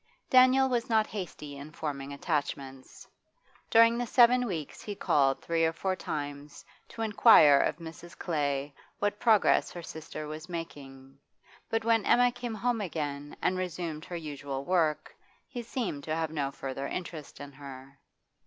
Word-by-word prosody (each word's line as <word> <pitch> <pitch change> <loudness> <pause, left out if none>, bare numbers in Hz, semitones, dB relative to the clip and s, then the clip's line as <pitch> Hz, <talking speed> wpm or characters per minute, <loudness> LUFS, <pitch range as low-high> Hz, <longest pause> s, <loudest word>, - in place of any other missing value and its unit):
Daniel 255 +1 +6
was 240 -2 -1
not 220 -1 +3
hasty 165 -9 -7
in 140 +2 -9
forming 140 -3 -5
attachments. 140 -3 -4 0.6
During 230 +1 +5
the 245 - -2
seven 250 +1 +5
weeks 160 -8 -5
he 205 - -6
called 135 -7 +2
three 165 -1 0
or 160 - +3
four 190 +3 -2
times 145 -3 -6 0.2
to 225 - -5
inquire 205 -10 +7
of - - +1
Mrs. 165 +1 -11
Clay 145 -4 -2 0.2
what 205 0 -1
progress 220 -4 +4
her 175 - -8
sister 155 -1 -7
was 155 +3 -8
making, 135 -5 -8 0.5
but 225 0 -1
when 225 -2 +3
Emma 245 +3 +4
came 240 -2 -5
home 235 +1 0
again, 145 -5 -4
and 185 0 +1
resumed 170 -3 -4
her 175 - -7
usual 140 -3 -6
work, 165 -4 0 0.3
he 245 -3 -6
seemed 225 - -4
to 155 - -1
have 160 -1 -2
no 145 -3 -1
further 135 0 -5
interest 165 -4 -6
in 145 0 -8
her. 135 -1 -11
160 Hz, 155 wpm, -29 LUFS, 145-215 Hz, 0.6 s, inquire